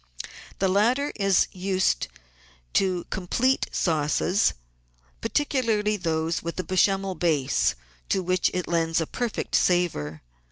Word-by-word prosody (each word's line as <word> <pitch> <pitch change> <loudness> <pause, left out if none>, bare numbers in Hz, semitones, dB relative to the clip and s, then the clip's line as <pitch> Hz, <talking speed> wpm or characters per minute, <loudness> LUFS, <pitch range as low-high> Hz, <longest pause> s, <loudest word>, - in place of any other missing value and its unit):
The 195 - +1
latter 235 +9 +2
is 195 -3 +3
used 185 - 0 0.7
to 185 -2 +1
complete 245 +8 +1
sauces, 160 +5 +1 0.7
particularly 230 -7 +1
those 165 -3 -1
with 170 +2 -5
a - - 0
Bechamel 190 +2 +1
base 155 -7 +1 0.3
to 190 - +1
which 185 +1 +1
it 180 -1 -3
lends 165 -1 +1
a 160 - 0
perfect 240 +6 -4
savour. 120 - +1
185 Hz, 115 wpm, -25 LUFS, 170-205 Hz, 0.7 s, is